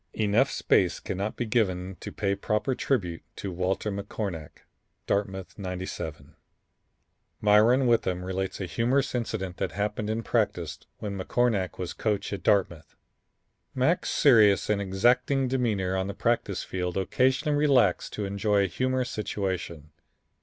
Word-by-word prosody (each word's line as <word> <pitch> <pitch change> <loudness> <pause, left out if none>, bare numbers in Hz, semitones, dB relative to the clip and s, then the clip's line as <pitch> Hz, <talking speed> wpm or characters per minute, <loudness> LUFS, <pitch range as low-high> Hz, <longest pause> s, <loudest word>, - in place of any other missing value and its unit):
Enough 110 +5 +3
space 90 -3 +2
cannot 100 +3 -3
be 120 - -2
given 95 -5 0
to - - -7
pay 100 -2 -1
proper 105 +6 -1
tribute 90 -11 -1
to 100 - -5
Walter 95 +4 -1
McCornack, 100 -5 -5 0.4
Dartmouth 95 -1 -2
'97. 90 -5 -6 1.0
Myron 110 +5 +5
Witham 95 -7 +1
relates 95 0 -3
a 95 - -2
humorous 125 +8 0
incident 110 -7 -3
that 90 - -2
happened 105 +2 -2
in 110 +1 -1
practice 100 -10 -1 0.2
when 100 -2 -5
McCornack 100 -1 0
was 90 -2 -4
coach 105 -2 -2
at 100 - -4
Dartmouth. 85 -5 0 0.8
"Mac's 135 +7 +1
serious 105 -8 +5
and 100 -1 +1
exacting 120 +7 +2
demeanor 110 -8 0
on 95 0 -1
the 100 - -5
practice 115 -5 0
field 90 0 -3
occasionally 130 - +1
relaxed 135 -10 +3
to 105 - -3
enjoy 100 +1 +1
a - - +1
humorous 130 +6 -1
situation. 90 -7 -4
100 Hz, 135 wpm, -27 LUFS, 95-115 Hz, 1.0 s, Myron